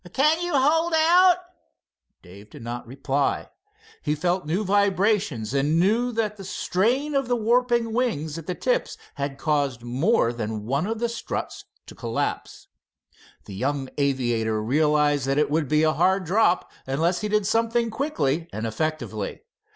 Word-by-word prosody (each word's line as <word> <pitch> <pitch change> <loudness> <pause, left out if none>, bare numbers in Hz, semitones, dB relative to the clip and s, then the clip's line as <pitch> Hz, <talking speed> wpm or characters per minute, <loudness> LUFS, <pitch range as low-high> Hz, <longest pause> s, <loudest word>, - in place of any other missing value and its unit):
"Can 305 +5 +3
you 350 0 -2
hold 320 +5 +3
out?" 350 +3 +5 0.9
Dave 100 +3 -14
did - - -12
not 120 +1 -6
reply. 135 +2 -1 0.5
He 150 - -1
felt 175 +2 -1
new 180 +7 0
vibrations, 195 - +1
and 145 +4 +2
knew 225 +7 +2
that 215 -2 -1
the 195 - -9
strain 240 +10 0
of 275 -3 0
warping 240 +1 +2
the 230 - -5
wings 220 - -1
at 160 - -12
the 180 - -2
tips - - -1 0.2
had 140 -1 -4
caused 140 -6 -1
more 125 - +1
than 110 -2 -4
one 140 - 0
of 225 +1 -2
the 235 +2 0
struts 235 -1 -5 0.2
to - - -11
collapse. - - -4 0.8
The 100 - -9
young 135 +6 -2
aviator 120 -6 0
realized 145 +3 +2
that 135 +1 +1
it 150 -1 +2
would 155 -1 +1
be 155 +3 +2
a 155 0 +3
hard 190 +3 +2
drop 185 0 +2 0.2
unless 165 +7 0
he 210 - -1
did 210 -1 +1
something 230 +2 +1
quickly 165 - -1
and 110 - -4
effectively. 115 -3 -3
165 Hz, 160 wpm, -24 LUFS, 135-230 Hz, 0.9 s, out